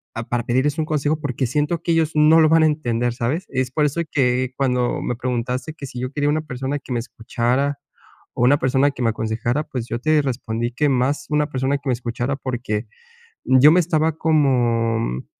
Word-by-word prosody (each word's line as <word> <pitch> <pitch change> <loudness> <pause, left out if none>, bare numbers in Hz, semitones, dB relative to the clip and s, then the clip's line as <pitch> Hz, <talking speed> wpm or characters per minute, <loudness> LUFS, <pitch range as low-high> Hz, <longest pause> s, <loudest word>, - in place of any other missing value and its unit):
ah, 115 - -3
p - - -18
a - - -36
para 120 -1 -1
pedirles 130 +5 +1
un 155 - 0
consejo, 150 0 0
porque 130 -3 -2
siento 150 +5 -1
que 170 - +1
ellos 160 -1 +1
no 155 +2 +6
lo 155 - +5
van 165 0 +5
a - - +5
entender, 120 -6 -1
¿sabes? 130 +9 -2
Es 130 -1 -2
por 150 +2 +1
eso 150 +4 -1
que 125 -2 +1
cuando 125 -3 0
me 125 - -2
preguntaste, 125 +4 -3
que 140 -4 -8
si 125 - -8
yo 130 +1 -3
quería 145 0 0
una 155 +1 +1
persona 135 +1 -3
que 130 - -12
me 120 - 0
escuchara 125 +4 -2 0.6
o - - 0
una 135 +4 +5
persona 135 +2 +2
que 130 - -8
me 115 - +3
aconsejara, 115 +6 -2
pues, 120 -2 -5
yo 120 - -2
te 155 +2 +2
respondí, 120 -3 -3
que 150 +2 +2
más 135 +2 0
una 150 -1 +1
persona 135 +1 0
que 140 0 -11
me - - +3
escuchara, 120 +2 -3
porque, 120 -4 -3 0.7
yo 150 - +8
me 180 - +5
estaba 160 -2 0
como 120 -7 +2
mm, 65 - -4
130 Hz, 220 wpm, -21 LUFS, 120-150 Hz, 0.7 s, yo